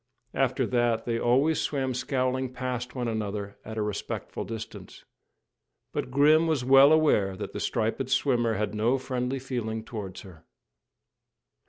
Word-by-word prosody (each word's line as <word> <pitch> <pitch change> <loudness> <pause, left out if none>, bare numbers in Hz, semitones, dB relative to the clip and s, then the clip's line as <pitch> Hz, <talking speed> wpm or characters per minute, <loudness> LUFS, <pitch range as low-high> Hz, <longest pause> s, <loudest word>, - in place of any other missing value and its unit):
After - - +1
that 120 -2 +1
they 115 -1 -1
always 135 +7 +2
swam 135 -3 -1
scowling 130 0 -1
past 125 0 -4
one 125 -2 -2
another 105 -2 -4
at 110 0 -7
a 110 - 0
respectful 105 -1 -4
distance; 115 +2 -8 0.9
but - - -2
Grim 150 +5 +4
was 150 -6 0
well 135 +2 +7
aware 125 -12 +3
that - - -6
the - - -4
striped 115 +4 -1
swimmer 120 -6 +2
had 105 +2 -2
no 115 +5 +2
friendly 130 0 -2
feeling 120 -4 -4
towards 105 -5 -7
her. 85 -5 -14
125 Hz, 145 wpm, -27 LUFS, 110-130 Hz, 0.9 s, well